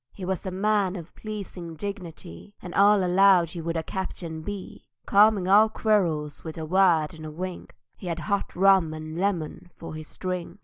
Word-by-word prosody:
He 190 Hz, -, -8 dB
was 190 Hz, 0 st, -3 dB
a -, -, 0 dB
man 195 Hz, 0 st, +1 dB
of 170 Hz, -2 st, -9 dB
pleasing 195 Hz, -6 st, -7 dB
dignity, 180 Hz, -, -8 dB
And 180 Hz, -, -9 dB
all 200 Hz, 0 st, +5 dB
allowed 180 Hz, -2 st, +4 dB
he 170 Hz, -, -6 dB
would 165 Hz, +1 st, -2 dB
a 160 Hz, -, -2 dB
captain 170 Hz, -3 st, -5 dB
be, 200 Hz, +3 st, -8 dB, 0.2 s
Calming 205 Hz, -2 st, +4 dB
all 210 Hz, +3 st, +6 dB
quarrels 170 Hz, -10 st, 0 dB
with 160 Hz, -1 st, -7 dB
a 160 Hz, -, -4 dB
word 170 Hz, -3 st, +3 dB
and 155 Hz, -1 st, -9 dB
wink; 185 Hz, 0 st, -6 dB, 0.2 s
He 185 Hz, -, -9 dB
had 170 Hz, -1 st, -2 dB
hot 200 Hz, +3 st, -2 dB
rum 185 Hz, -4 st, +4 dB
and 155 Hz, 0 st, -7 dB
lemon 175 Hz, -3 st, -2 dB
for 165 Hz, -1 st, -10 dB
his 155 Hz, 0 st, -9 dB
drink. 180 Hz, -1 st, -4 dB
180 Hz, 180 wpm, -26 LUFS, 160-195 Hz, 0.2 s, all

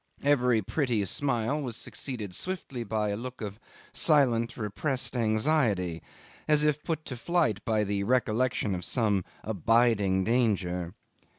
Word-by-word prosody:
Every 125 Hz, -6 st, +3 dB
pretty 120 Hz, -3 st, 0 dB
smile 135 Hz, +5 st, 0 dB
was 120 Hz, -5 st, -5 dB
succeeded 110 Hz, -9 st, -5 dB
swiftly 140 Hz, -, -4 dB
by 110 Hz, -1 st, -1 dB
a 100 Hz, -, -1 dB
look 125 Hz, +4 st, -7 dB
of 105 Hz, -1 st, -6 dB, 0.3 s
silent, 120 Hz, -7 st, +2 dB
repressed 120 Hz, +6 st, -2 dB
anxiety, 110 Hz, -, +1 dB, 0.5 s
as 150 Hz, -1 st, +4 dB
if 150 Hz, -1 st, +1 dB
put 160 Hz, -2 st, -3 dB
to 130 Hz, -, -5 dB
flight 140 Hz, -, 0 dB
by 110 Hz, -2 st, +2 dB
the 100 Hz, -1 st, -1 dB
recollection 120 Hz, -2 st, +1 dB
of 90 Hz, -1 st, -4 dB
some 105 Hz, -6 st, +1 dB, 0.2 s
abiding 105 Hz, -2 st, +2 dB
danger. 95 Hz, -7 st, 0 dB
115 Hz, 130 wpm, -28 LUFS, 105-130 Hz, 0.5 s, as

